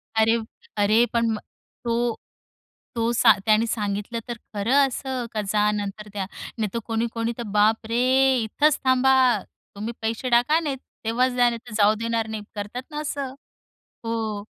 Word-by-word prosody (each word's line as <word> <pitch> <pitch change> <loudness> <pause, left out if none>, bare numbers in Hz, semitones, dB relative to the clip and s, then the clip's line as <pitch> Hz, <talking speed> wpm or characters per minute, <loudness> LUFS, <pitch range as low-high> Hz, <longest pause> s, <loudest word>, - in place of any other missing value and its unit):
अरे, 220 +1 +4 0.4
अरे, 215 +3 +4
पण 230 -1 +2
म 220 - -1 0.5
तो 235 -1 0 0.8
तो 230 0 +1
सा 235 -1 +6
त्याने 215 +1 +4
सांगितलं 210 +1 -2
तर 240 -1 -4 0.2
खरं 210 +6 +1
असं 260 -1 -4
का, 215 - -1
जा 210 +1 +1
नंतर 210 0 -4
द्या. 200 -2 -2 0.3
नाहीतर 215 +1 -1
कोणी-कोणी 230 0 -1
तर 240 - -4
बाप 220 +2 +3
रे! 235 +2 +2 0.4
इथेच 295 +7 +2
थांबा. 260 +1 +4 0.6
तुम्ही 215 +4 -4
पैसे 225 +3 -2
टाका 245 +7 +4
नाही 295 -5 -2 0.3
तेव्हाच 250 +3 +2
जा, 245 -1 +4
नाहीतर 235 -1 -7
जाऊ 210 0 +5
देणार 230 -1 -1
नाहीत. 220 -1 -5
करतात 210 +5 -5
ना 300 - -4
असं, 280 -3 -4 0.7
हो. 220 -3 -2
230 Hz, 150 wpm, -24 LUFS, 215-245 Hz, 0.8 s, सा